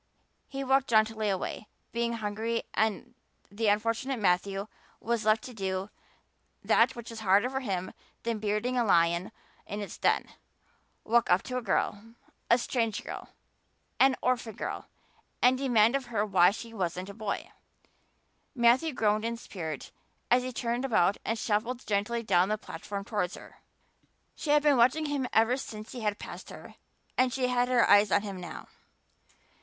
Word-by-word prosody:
He 275 0 -5
walked 270 0 +2
jauntily 220 -1 +2
away, 195 +2 -3 0.2
being 235 0 -1
hungry, 225 +1 -2
and 220 -3 -1 0.4
the 220 +2 -1
unfortunate 230 +5 +1
Matthew 195 0 +1 0.3
was 230 -1 -1
left 215 0 +3
to 255 - -8
do 190 -1 -3 0.7
that 235 +3 +4
which 235 -1 -8
was 225 - -7
harder 205 +4 +3
for 265 - -1
him 190 -7 -3 0.3
than 230 -2 -2
bearding 210 +4 -1
a - - +3
lion 170 -2 +2 0.4
in 205 - -4
its 205 - -7
den - - +2 0.8
walk 235 +1 +2
up 180 - +4
to 255 - -4
a - - -1
girl 225 +1 -2 0.3
a 235 - +6
strange 230 -3 -1
girl - - -7 0.7
an 265 0 +5
orphan 240 -3 0
girl - - -5 0.5
and 255 +1 +4
demand 240 -3 +4
of 270 -2 -2
her 220 -3 0
why 180 -3 +5
she 225 +3 -7
wasn't 180 -2 -3
a - - -7
boy. 205 -1 -4 1.0
Matthew 250 +6 +4
groaned 215 -2 +1
in 230 0 -2
spirit 160 - -6 0.4
as 250 +1 +5
he 255 +1 -4
turned 240 +1 -2
about 205 -7 +2
and 225 - -1
shuffled 230 +4 -1
gently 215 +3 -1
down 185 -2 +3
the 215 - 0
platform 200 +1 -7
towards 200 -5 -2
her. - - -13 0.8
She 305 - -6
had 295 0 +5
been 290 -3 +4
watching 255 +7 +4
him 285 -3 -1
ever 225 +3 +3
since 215 -4 -8
he 245 - -7
had 210 -1 -1
passed - - -9
her - - -11 0.5
and 255 0 +4
she 255 0 0
had 245 0 +2
her 250 -1 +4
eyes 205 -1 +6
on - - +3
him 195 -3 -6
now. 170 -3 -8
225 Hz, 165 wpm, -29 LUFS, 205-245 Hz, 1.0 s, a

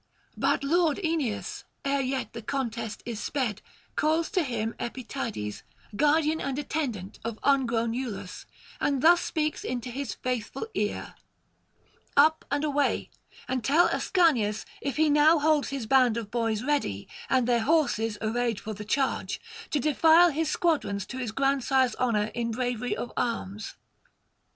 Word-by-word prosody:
But - - +1
lord 320 +1 +2
Aeneas, 300 -10 -2 0.2
ere 280 0 +1
yet 260 -2 -2
the 230 - -6
contest 230 -3 -3
is 230 -3 -4
sped, 235 -8 -2 0.3
calls 320 +2 +1
to 380 -4 +2
him 235 -6 -2
Epytides, 230 - -4 0.3
guardian 305 +4 +3
and 275 -1 -2
attendant 255 -11 -3
of 230 -1 -4
ungrown 235 -5 +2
Iülus, 215 -6 -5 0.3
and 275 -1 0
thus 345 +2 +7
speaks 305 -1 -1
into 250 0 -3
his 265 -2 -4
faithful 250 - -3
ear: 210 0 -2 1.0
'Up 310 +3 +5
and 285 +2 0
away, 290 -1 0 0.4
and 255 -2 -1
tell 330 +7 +4
Ascanius, 250 - +2 0.2
if 280 0 -3
he 315 0 +4
now 300 +2 +5
holds 300 -1 +2
his 275 -4 -4
band 250 -1 +4
of 215 -3 -5
boys 225 -2 0
ready, 270 - -1 0.2
and 255 -2 +3
their 240 -2 +3
horses 225 -6 +1
arrayed 230 0 0
for 215 - -5
the 210 +1 -7
charge, 265 +5 -1 0.3
to 295 - 0
defile 320 +4 +5
his 315 +1 -1
squadrons 285 - 0
to 260 - -7
his 245 -4 -3
grandsire's 265 -1 +2
honour 220 -4 +1
in 235 -1 -2
bravery 245 +1 -2
of 240 - -5
arms.' 215 -3 -3
260 Hz, 145 wpm, -27 LUFS, 225-295 Hz, 1.0 s, thus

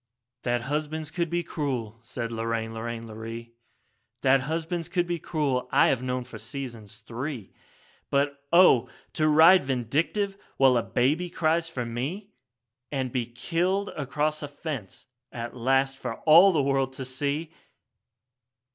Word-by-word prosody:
4 120 - +1
'That 120 0 +1
husbands 150 +3 -3
could 170 -1 -1
be 175 +1 0
cruel,' 130 -9 -3
said 115 0 -5
Lorraine, 115 0 -2
Lorraine, 115 0 -5
Lorree, 115 +1 -8 0.7
'That 135 0 +4
husbands 165 +4 -3
could 175 0 +1
be 175 -1 -2
cruel, 140 -6 -1
I - - +5
have 130 - +1
known 125 0 -2
for 125 - -10
seasons 120 -7 -8
three; 120 -3 -6 0.6
But 140 0 0
oh! 170 -9 +6 0.2
to 155 - +2
ride 160 +4 +7
Vindictive 150 - -1 0.2
while 135 -2 +5
a 120 - +3
baby 150 +11 +1
cries 165 0 +1
for 125 -7 -4
me, 145 - -4 0.6
And 130 -3 -2
be 120 -2 -1
killed 175 +11 -1
across 150 +2 -2
a 145 - -4
fence 145 - -7 0.3
at 115 0 -6
last 135 +2 +1
for 120 -3 -4
all 170 +5 +8
the 155 -5 +2
world 135 -1 +1
to 130 0 -5
see!' 145 +5 -2
135 Hz, 145 wpm, -27 LUFS, 120-160 Hz, 0.7 s, all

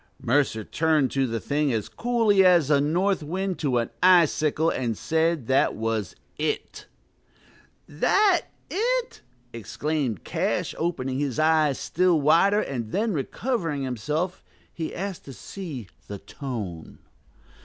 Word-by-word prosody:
Mercer 120 -4 +1
turned 155 +1 +1
to 135 -1 +1
the 115 -1 -2
thing 145 +2 0
as 110 -3 -2
coolly 230 -5 +2
as 175 -6 +4
a 140 -1 +4
north 180 +7 +1
wind 185 +4 -3
to 135 -5 0
an 115 - -1
icicle, 165 -3 +4
and 115 -4 -2
said, 160 -3 0
that 130 +3 +2
was 110 -2 -2 0.2
it. - - -3 1.0
"That 380 - +2 0.2
it!" 480 +4 -1 0.3
exclaimed 125 - -3
Cash, - - -1
opening 135 -6 -2
his 140 -5 -2
eyes 155 -3 +3
still 180 -1 +1
wider; 170 +8 +4
and 120 - -4
then, 220 +1 0
recovering 165 - -2
himself, 150 - -3 0.3
he 160 -2 -5
asked 195 0 -5
to 135 - -9
see 140 - -8 0.2
"the 100 - -6
tone." 105 - -7
150 Hz, 130 wpm, -25 LUFS, 130-180 Hz, 1.0 s, as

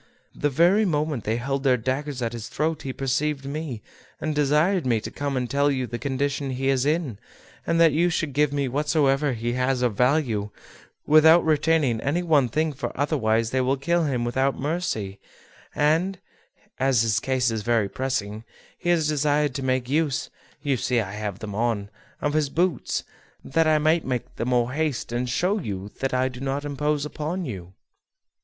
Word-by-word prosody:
The 145 - 0
very 175 +9 +4
moment 150 - -1
they 110 - 0
held 135 +3 -2
their 130 -2 +3
daggers 130 +2 -3
at 115 0 -2
his 115 -2 -6
throat 155 +1 -1
he 135 - -4
perceived 135 +2 -1
me, 140 -5 -5 0.4
and 155 - -2
desired 150 +5 +2
me 120 -3 +1
to - - -7
come 140 -2 -3
and 125 -1 -1
tell 140 +2 +2
you 130 -2 0
the 120 0 -5
condition 140 0 -1
he 135 +1 -1
is 135 0 +2
in, 150 - -1 0.5
and 165 - +2
that 165 -1 +6
you 170 +4 +2
should 160 -4 -2
give 150 0 +2
me 140 -1 0
whatsoever 145 0 +1
he 120 +1 -2
has 125 0 0
of 120 -3 +2
value, 125 -5 +1 0.6
without 160 +3 +6
retaining 150 -6 +2
any 160 +6 0
one 150 -7 +3
thing; 155 +4 0
for 135 - -4
otherwise 115 -6 +1
they 130 - +1
will 130 +2 +1
kill 170 +4 +1
him 125 -5 -1
without 130 +3 0
mercy; 135 - -2 0.6
and, 165 +6 +2 0.6
as 130 -4 +3
his 110 -3 +2
case 130 -2 0
is 110 -1 -2
very 115 -1 +1
pressing, 110 -3 -3 0.4
he 175 - -2
desired 150 -3 +2
me - - -18
to 135 - -4
make 130 -1 0
use 145 0 0 0.3
(you 140 -3 +1
see 125 0 +1
I 100 -4 -3
have 105 -2 -4
them 110 -2 -7
on) 110 -2 -1 0.3
of 145 - 0
his 150 -2 +1
boots, 175 0 0 0.4
that 165 +3 +1
I 155 -1 +4
might 155 +2 +2
make 125 -2 -4
the 115 - -2
more 125 -1 +1
haste 150 -6 -2
and 120 +1 -1
to - - -3
show 185 - +1
you 100 - -5
that 135 - -1
I 130 0 +1
do 125 -1 -8
not 135 +2 -2
impose 145 +1 -1
upon 160 +5 -4
you." 95 - -7
135 Hz, 190 wpm, -24 LUFS, 120-150 Hz, 0.6 s, that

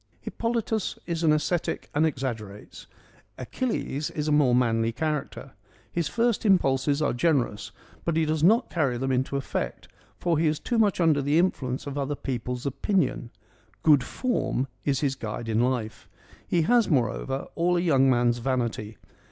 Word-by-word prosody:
Hippolytus 230 -2 -2
is 170 -2 -3
an 160 -2 +4
ascetic 155 +3 -1
and 155 +2 +3
exaggerates: 115 -8 -6 0.5
Achilles 150 - -3
is 150 0 -3
a - - +1
more 145 -5 +4
manly 115 -2 +2
character. 145 0 -3 0.4
His 170 -3 -1
first 235 +4 0
impulses 145 - +2
are 145 - +1
generous, 125 -6 0 0.3
but 170 - -1
he 160 - +3
does 155 0 -1
not 225 +8 +4
carry 140 -8 0
them 135 +2 -1
into 130 +2 0
effect, 135 - -4 0.3
for 170 -3 0
he 165 - +2
is 150 0 0
too 240 -2 -1
much 205 -4 +2
under 160 -4 +3
the 145 +3 +1
influence 135 -8 0
of 140 0 -4
other 140 +1 -2
people's 125 -2 -4
opinion: 140 - 0 0.3
' 110 -2 -35
good 145 -5 +5
form 235 - -1
' - - -39
is 135 -3 +1
his 140 -3 +1
guide 115 -2 -6
in 110 0 +1
life. 120 -3 -2 0.4
He 170 -2 +2
has 235 +5 +3
moreover, 135 - 0
all 175 +1 +1
a - - +1
young 135 -6 +4
man's 120 -1 +2
vanity. 115 -4 -2
140 Hz, 170 wpm, -26 LUFS, 125-165 Hz, 0.5 s, good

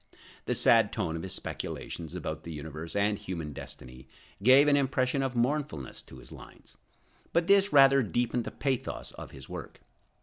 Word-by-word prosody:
The - - 0
sad - - +5
tone 80 - -2
of 80 - -4
his 95 - -5
speculations 80 -3 -6
about - - -4
the 85 - -7
universe 80 +1 -7
and 100 0 +1
human 80 -5 -5
destiny 65 0 -10 0.3
gave 130 +6 +7
an 145 - +5
impression 135 -1 +1
of 135 -2 -2
mournfulness 120 - -2
to 65 - -14
his 65 - -13
lines, - - -14 0.6
but 170 - +3
this 200 +1 +4
rather 135 -1 +7
deepened 120 +1 -1
the - - -3
pathos 135 -3 -3
of - - -10
his 65 -1 -12
work. - - -8
120 Hz, 170 wpm, -29 LUFS, -, 0.6 s, gave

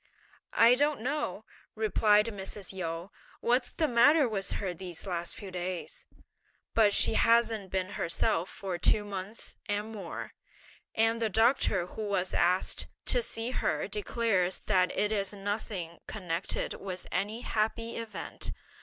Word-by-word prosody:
"I 230 +1 +8
don't 290 0 +2
know," 250 -6 -2 0.3
replied 210 -1 +4
Mrs. 200 -2 -5
Yu, 170 0 -4 0.3
"what's 245 +1 +1
the 315 - +1
matter 280 +4 +6
with 200 -4 -2
her 190 -3 -2
these 175 -1 -7
last 175 -3 -3
few 195 -2 -8
days; 180 0 -5 0.7
but 215 -2 +5
she 200 - +5
hasn't 225 -3 +3
been 185 0 -1
herself 170 -2 0
for 185 -3 -4
two 210 +4 +3
months 200 +2 -7
and 210 +1 -2
more; 200 -6 -6 0.6
and 225 +1 +2
the 225 - +2
doctor 220 -4 +3
who 200 - -7
was 200 -3 -1
asked 180 +2 +2 0.2
to - - +2
see 230 - -3
her - - 0
declares 225 - 0
that 185 -3 +2
it 210 - +2
is 200 -2 0
nothing 200 -4 -4
connected 175 -6 -2
with 185 -2 -6
any 210 +5 -1
happy 230 +1 -1
event. 230 -1 -5
205 Hz, 140 wpm, -30 LUFS, 185-230 Hz, 0.7 s, I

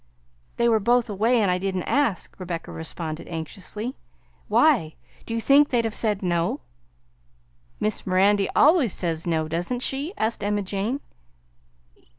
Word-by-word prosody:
"They 235 - +3
were 225 -2 +4
both 235 +1 +2
away 225 +5 +2
and 190 - +2
I 180 - 0
didn't 190 -1 -2
ask," 280 -10 0
Rebecca 175 -2 -5
responded 160 0 -5
anxiously. 195 - -5 0.5
"Why? 250 - +3 0.3
Do 230 - -3
you - - 0
think 280 +5 +5
they'd 235 -2 +1
have 225 - -2
said 210 -3 0
no?" 175 - 0 1.2
"Miss 210 -2 -2
Mirandy 195 +2 +3
always 300 - +5
says 165 -2 -2
no, 160 -2 0
doesn't 175 +10 -2
she?" 285 +9 -2
asked 220 -1 -1
Emma 205 0 0
Jane. 205 +8 -2
205 Hz, 145 wpm, -24 LUFS, 175-240 Hz, 1.2 s, think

